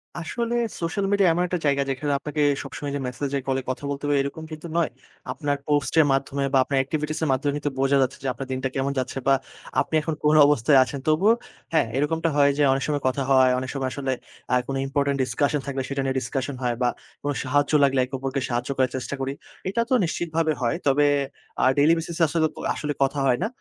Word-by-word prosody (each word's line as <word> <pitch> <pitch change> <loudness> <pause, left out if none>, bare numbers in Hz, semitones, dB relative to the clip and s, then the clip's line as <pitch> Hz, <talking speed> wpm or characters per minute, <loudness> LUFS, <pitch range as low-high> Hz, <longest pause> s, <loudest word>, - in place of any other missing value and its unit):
আসলে 235 +8 -3 0.3
social 180 +4 -1
media 200 -3 +4
এমন 175 +2 +1
একটা 180 -1 -2
জায়গা 140 -1 +2
যেখানে 145 +2 -1
আপনাকে 150 +1 -3 0.2
সবসময় 140 0 -6
যে - - -2
মেসেজে-কলে 135 0 -2
কথা 130 - -3
বলতে 140 0 -4
হবে, 145 0 +2
এইরকম 140 +3 -5
কিন্তু 155 +2 -7
নয়। 170 - +2 0.4
আপনার 145 -2 -1
পোস্টের 150 +1 +3
মাধ্যমে 135 +1 0
বা - - +5
আপনার 140 0 -1
activities 155 +2 -3
এর - - +1
মাধ্যমে 140 +2 0
কিন্তু 145 -1 -2
বোঝা 135 +1 +3
যাচ্ছে 130 0 0
যে - - -2
আপনার 135 +2 -7
দিনটা 130 0 -1
কেমন 135 +1 0
যাচ্ছে 130 +1 -4
বা 135 - +6 0.5
আপনি 160 - -3
এখন 160 +1 -2
কোন 150 +1 +4
অবস্থায় 140 0 +4
আছেন। 140 +1 -6
তবুও 180 +8 +4 0.4
হ্যাঁ, 155 - +3
এইরকমটা 160 +3 +1
হয় 140 0 +6
যে 145 - +3
অনেক 135 - -1
সময় 145 -2 -1
কথা 135 +1 0
হয়, 130 -1 +6
অনেক 130 0 -5
সময় 135 -2 -2
আসলে 135 -2 -2 0.4
আ - - +6
কোনো 135 0 -2
important 140 0 0
discussion 145 +3 0
থাকলে, 135 -1 -2
সেটা 140 0 -1
নিয়ে 135 0 -1
ডিসকাশন 135 +1 -3
হয় 120 -1 0
বা 125 - +3 0.3
কোনো 145 0 -1
সাহায্য 145 +3 +1
লাগলে, 135 -1 +3
একে 130 - -20
অপরকে 135 0 -2
সাহায্য 120 +2 -2
করার 130 -1 +2
চেষ্টা 135 +2 -4
করি। 135 +1 -2 0.4
এটা 235 +4 0
তো - - +2
নিশ্চিতভাবে 165 -1 -1
হয়। 120 - +1
তবে 145 +2 +4 0.6
আ - - +5
daily 150 +3 +5
basis 165 0 -5
এ - - +7
আসলেতো 160 +1 +1 0.3
আসলে 145 -1 -3
কথা 140 +1 0
হয় 125 -1 +3
না। - - +1
140 Hz, 215 wpm, -24 LUFS, 135-155 Hz, 0.6 s, এ